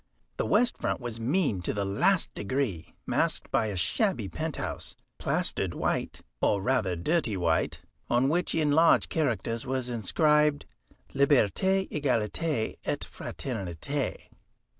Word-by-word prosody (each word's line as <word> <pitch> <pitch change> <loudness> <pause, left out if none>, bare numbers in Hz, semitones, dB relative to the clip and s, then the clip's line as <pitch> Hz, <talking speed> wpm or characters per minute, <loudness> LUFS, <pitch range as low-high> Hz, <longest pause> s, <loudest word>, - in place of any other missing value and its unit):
The - - -1
west 245 0 +3
front - - -1
was 120 -3 -5
mean 130 - +1
to 90 - -2
the 100 -1 -1
last 175 - +2
degree, 105 - -3
masked - - 0
by 110 - +2
a 105 - -3
shabby 145 - 0
penthouse, 80 -1 -4 0.2
plastered - - -1
white, - - -2 0.2
or 100 - +3
rather 105 -4 +1
dirty 115 - +1
white, 85 -2 0 0.3
on 125 +2 +3
which 175 +4 0
in 155 -2 +2
large 165 +3 +5
characters 115 -6 -1
was 130 -2 -2
inscribed, 150 - +2 0.5
"Liberté 145 - +3
égalité 130 -1 -1
et - - -2
fraternité." 120 - -4
130 Hz, 125 wpm, -28 LUFS, 105-150 Hz, 0.5 s, large